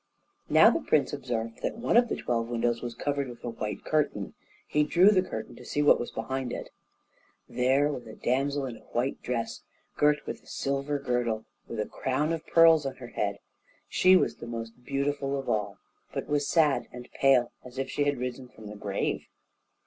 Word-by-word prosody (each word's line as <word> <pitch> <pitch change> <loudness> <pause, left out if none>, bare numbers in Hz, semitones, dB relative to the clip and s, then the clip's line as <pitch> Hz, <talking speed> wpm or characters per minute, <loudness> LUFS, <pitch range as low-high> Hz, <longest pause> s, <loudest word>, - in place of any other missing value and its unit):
Now - - +7
the - - 0
prince - - +2
observed 115 -2 -3
that - - -2
one 230 - 0
of 240 0 +5
the - - 0
twelve 115 -1 -1
windows 120 0 0
was 120 -1 -5
covered 140 +1 -1
with 120 - -11
a 120 - -3
white 105 -2 -5
curtain; 145 -10 0 0.3
he 150 - +2
drew 175 +7 +5
the 190 -3 +4
curtain 110 -12 -6
to 125 - -11
see 145 +4 -1
what 145 - +6
was 120 - -3
behind 125 +2 -3
it. - - -6 0.8
There 130 +3 +2
there 145 - +2
was 125 -4 -7
a 110 - -9
damsel 140 +3 0
in 120 -3 -6
a - - -21
white 125 +3 -1
dress, 120 -2 -3 0.4
girt 150 0 +3
with - - -5
a - - -24
silver 140 +1 -1
girdle, 120 -5 -1 0.2
with 115 - -5
a 105 - 0
crown 145 +5 -1
of 160 - -5
pearls 165 -2 +6
on 135 - -5
her 120 -2 -10
head; - - -2 0.5
she 185 +1 +5
was - - +2
the - - -8
most 115 +1 -7
beautiful 140 +1 -1
of 135 - -5
all, 105 -2 -1 0.3
but - - -3
was 145 -1 0
sad 155 -5 +3
and 125 0 -9
pale, 130 -3 +4
as 125 0 -12
if 135 - -1
she 145 - 0
had 145 -1 +1
risen 125 +1 -4
from 110 -3 -15
the 105 - -8
grave. 100 -1 -2
130 Hz, 205 wpm, -28 LUFS, 120-145 Hz, 0.8 s, Now